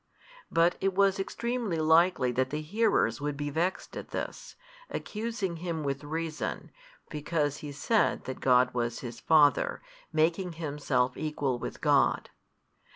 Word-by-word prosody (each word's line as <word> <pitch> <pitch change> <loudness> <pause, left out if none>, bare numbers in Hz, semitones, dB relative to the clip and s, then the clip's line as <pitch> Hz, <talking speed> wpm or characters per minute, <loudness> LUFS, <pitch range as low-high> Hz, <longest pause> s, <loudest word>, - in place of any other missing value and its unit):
But 165 +1 +3
it 195 -1 +1
was 195 0 +3
extremely 235 -2 -2
likely 160 -4 +4
that 130 +1 0
the 150 +2 -3
hearers 175 - +1
would 145 -1 -2
be 145 0 -3
vexed 170 +5 -2
at - - -7
this, - - -5 0.3
accusing 210 -5 -3
Him 165 -2 -3
with 140 0 -2
reason, 160 +1 -4 0.4
because 150 -1 -1
He 145 - -7
said 210 +10 +1
that 130 - -6
God 125 0 +4
was 120 -1 -2
His 120 -2 -7
Father, 150 -3 +4 0.3
making 165 +3 +1
Himself 140 -5 -1
equal 145 -5 -2
with - - -6
God. - - +2
155 Hz, 140 wpm, -29 LUFS, 140-180 Hz, 0.4 s, likely